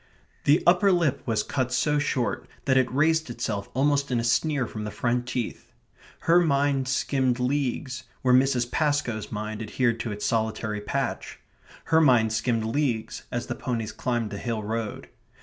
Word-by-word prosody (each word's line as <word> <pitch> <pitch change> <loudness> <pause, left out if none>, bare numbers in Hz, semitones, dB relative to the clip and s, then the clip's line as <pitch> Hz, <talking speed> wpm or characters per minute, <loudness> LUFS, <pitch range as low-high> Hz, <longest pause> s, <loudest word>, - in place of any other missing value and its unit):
The 145 +3 +4
upper 180 +3 +5
lip 170 -6 +1
was 110 -2 +1
cut 130 -2 -2
so 150 -1 +2
short 130 -4 -1 0.2
that 130 - +3
it 130 -1 +3
raised 160 +2 +2
itself 105 -4 -3
almost 140 +1 +2
in 125 -2 +1
a - - -1
sneer 140 +3 +1
from 110 -1 -6
the 105 - -3
front 120 +3 -1
teeth. 125 -2 -4 0.5
Her 170 +1 +5
mind 140 -4 +2
skimmed 130 -1 +1
leagues 130 -1 -1 0.2
where 125 -1 +4
Mrs. 125 -2 +3
Pascoe's 145 -8 0
mind 110 +1 -4
adhered 115 +1 0
to 115 -1 -3
its 105 0 -4
solitary 110 -1 -1
patch. 105 - -3 0.5
Her 160 0 +3
mind 120 -7 +4
skimmed 115 0 0
leagues 120 -2 -1
as - - -2
the - - -3
ponies 115 -3 -3
climbed 120 -4 -2
the 100 - -5
hill 115 -3 -3
road. 110 0 -4
125 Hz, 165 wpm, -26 LUFS, 115-140 Hz, 0.5 s, upper